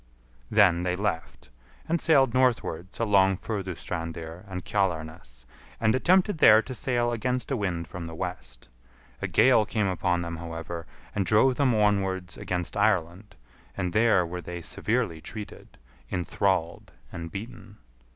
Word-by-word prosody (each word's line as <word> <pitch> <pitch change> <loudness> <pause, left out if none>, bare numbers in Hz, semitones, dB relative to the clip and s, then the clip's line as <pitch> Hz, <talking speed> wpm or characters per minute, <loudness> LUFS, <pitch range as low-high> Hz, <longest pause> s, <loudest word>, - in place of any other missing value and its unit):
Then 95 -5 +4
they 90 0 -1
left, 90 -9 -4 0.4
and 170 0 0
sailed 135 -7 +4
northwards 115 -8 0
along 95 -4 +3
Furdustrandir 85 -4 -5
and 90 -2 -6
Kjalarnes, 80 -10 -3 0.3
and 110 -1 +3
attempted 180 +6 +3
there 110 -5 +8
to 130 - -7
sail 120 -1 0
against 125 +3 -2
a - - +2
wind 90 -7 -2
from 90 -2 -7
the 80 - -8
west. - - -6 0.5
A - - -1
gale 130 -4 +5
came 105 0 -1
upon 90 -2 0
them, 85 0 -5
however, 85 0 -6 0.3
and 100 - 0
drove 110 +8 +3
them 130 -5 +3
onwards 95 -3 0
against 90 -1 -3
Ireland, 100 -1 0 0.4
and 90 -3 -2
there 105 -5 +4
were 90 +1 -6
they 85 +1 -7
severely 105 -8 -1
treated, 105 +3 -9 0.3
enthralled, 90 -1 -1 0.2
and 85 -1 -7
beaten. 105 -1 -9
95 Hz, 140 wpm, -27 LUFS, 85-110 Hz, 0.5 s, there